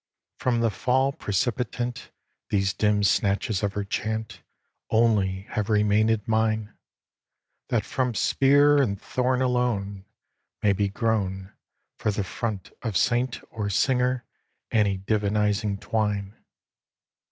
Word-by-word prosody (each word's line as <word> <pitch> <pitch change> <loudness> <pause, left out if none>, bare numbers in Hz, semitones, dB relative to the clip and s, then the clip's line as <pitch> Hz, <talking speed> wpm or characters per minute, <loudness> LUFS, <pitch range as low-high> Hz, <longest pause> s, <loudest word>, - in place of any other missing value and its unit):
From 120 -2 +1
the 115 -1 +2
fall 130 +5 +1
precipitant 120 - -2 0.4
These 95 -2 +1
dim 105 +3 +1
snatches 100 +1 +1
of 100 -1 -1
her 105 - -2
chant[B] 110 +1 -3 0.5
Only 105 -5 +2
have 105 -1 -1
remainèd 105 0 +2
mine; 110 -1 0 1.0
That - - +1
from 125 -3 -1
spear 145 +5 +4
and 100 -7 -1
thorn 130 +2 0
alone 110 -6 -1 0.6
May 100 -1 +4
be 100 +1 0
grown 100 -3 -1 0.5
For - - 0
the 100 -1 -1
front 105 0 -4
of 110 -6 -1
saint 120 +3 +1
or 105 -2 -3
singer 125 +3 +1 0.5
any 100 -3 +2
divinizing 105 0 0
twine. 105 -3 -1
110 Hz, 115 wpm, -25 LUFS, 100-120 Hz, 1.0 s, spear